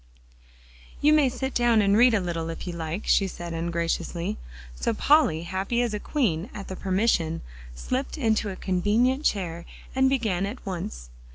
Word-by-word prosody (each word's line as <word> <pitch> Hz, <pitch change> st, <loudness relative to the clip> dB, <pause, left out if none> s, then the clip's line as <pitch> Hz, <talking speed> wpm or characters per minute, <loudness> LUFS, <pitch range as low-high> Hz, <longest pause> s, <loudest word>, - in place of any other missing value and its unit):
"You 300 Hz, +1 st, +5 dB
may 295 Hz, -4 st, +5 dB
sit 265 Hz, +2 st, -4 dB
down 240 Hz, -2 st, +3 dB
and 200 Hz, -1 st, +3 dB
read 240 Hz, +1 st, +6 dB
a -, -, +3 dB
little, 165 Hz, -3 st, -3 dB
if 165 Hz, -, -6 dB
you 175 Hz, -, -4 dB
like," 170 Hz, +3 st, -4 dB
she 195 Hz, -, +3 dB
said 175 Hz, -2 st, -7 dB
ungraciously. 170 Hz, -, -2 dB, 0.3 s
So 140 Hz, -, -1 dB
Polly, 245 Hz, -, +3 dB
happy 190 Hz, +7 st, -2 dB
as 235 Hz, -3 st, -2 dB
a 210 Hz, -, -2 dB
queen 205 Hz, -, -1 dB
at 200 Hz, -, -7 dB
the 190 Hz, -, -4 dB
permission, 185 Hz, -5 st, 0 dB, 0.3 s
slipped 260 Hz, -, -3 dB
into 220 Hz, -5 st, +1 dB
a 190 Hz, -, -5 dB
convenient 215 Hz, +10 st, +1 dB
chair, 170 Hz, -4 st, -1 dB, 0.3 s
and 265 Hz, 0 st, +3 dB
began 215 Hz, -8 st, 0 dB
at 230 Hz, +4 st, -8 dB
once. -, -, -5 dB
195 Hz, 170 wpm, -26 LUFS, 170-240 Hz, 0.3 s, read